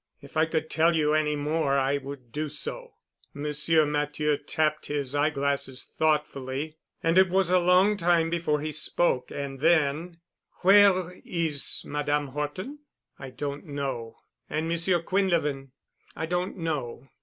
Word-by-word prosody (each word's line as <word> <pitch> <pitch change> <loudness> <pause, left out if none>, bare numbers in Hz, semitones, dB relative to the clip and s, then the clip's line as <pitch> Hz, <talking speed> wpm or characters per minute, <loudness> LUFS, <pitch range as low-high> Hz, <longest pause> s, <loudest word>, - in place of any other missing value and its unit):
If - - -15
I 155 +1 +3
could 160 -1 -2
tell 165 +1 +3
you 150 -1 +2
any 155 -1 +1
more 145 -1 0
I 135 +1 +1
would 135 -3 -9
do 150 +3 -3
so." - - -3 0.4
Monsieur 150 +2 +2
Matthieu 150 0 0
tapped 155 +1 -1
his 145 -2 -1
eye 145 +1 +2
glasses 140 -2 -1
thoughtfully 150 -1 -2 0.3
and 165 +3 +4
it 190 -1 +5
was 185 -1 +2
a 185 - +5
long 180 +4 +4
time 170 -2 +2
before 160 -3 0
he 155 +1 -3
spoke. 150 -4 +1
And 140 -1 -6
then, 160 +2 +1 0.4
"Where 190 -2 +5
is 160 -5 +1
Madame 145 -1 -1
Horton?" 150 - -5 0.4
"I 135 - -7
don't 140 +3 -6
know." 135 -6 -4 0.3
"And 160 +1 -2
Monsieur 170 +1 0
Quinlevin?" 165 -8 0 0.5
"I 160 - -3
don't 180 +4 -2
know." 145 -7 -4
150 Hz, 145 wpm, -27 LUFS, 140-170 Hz, 0.5 s, it